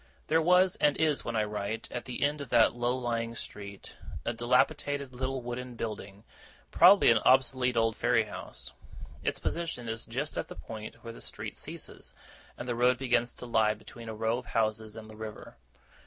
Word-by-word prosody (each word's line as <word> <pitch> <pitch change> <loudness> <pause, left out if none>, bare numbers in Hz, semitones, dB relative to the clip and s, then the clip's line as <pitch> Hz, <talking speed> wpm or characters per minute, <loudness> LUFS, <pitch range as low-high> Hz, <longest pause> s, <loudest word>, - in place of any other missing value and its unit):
There 160 +1 +4
was, 180 +2 +4
and 150 -1 +3
is 155 -3 +2
when 120 - -3
I 110 - +3
write, 105 +1 -3
at 125 - -4
the 125 - -3
end 145 +1 +1
of 140 - -7
that 115 -1 +5
low 120 +1 0
lying 115 -2 -2
street, 100 -3 -8 0.3
a 120 - 0
dilapidated 130 +3 +1
little 130 0 -2
wooden 120 +1 -5
building, 105 -3 -6 0.5
probably 185 -5 +8
an 115 - +5
obsolete 130 -1 +3
old 115 -1 +3
ferry 120 -2 +3
house. 105 - -7 0.5
Its - - -1
position 165 -8 -3
is 115 0 -4
just 135 +6 -3
at - - -3
that - - -10
point 110 -1 -8
where 115 -1 -7
the - - -12
street - - -6
ceases, - - -6 0.4
and - - -6
the 120 - 0
road 125 +1 +3
begins 120 -2 +1
to - - -8
lie 110 -2 +3
between 115 +2 -11
a 110 - -5
row 110 +2 0
of 125 - -12
houses 110 -1 -1
and 110 -1 -9
the 110 - -11
river. 110 -7 -8
120 Hz, 190 wpm, -30 LUFS, 110-130 Hz, 0.5 s, probably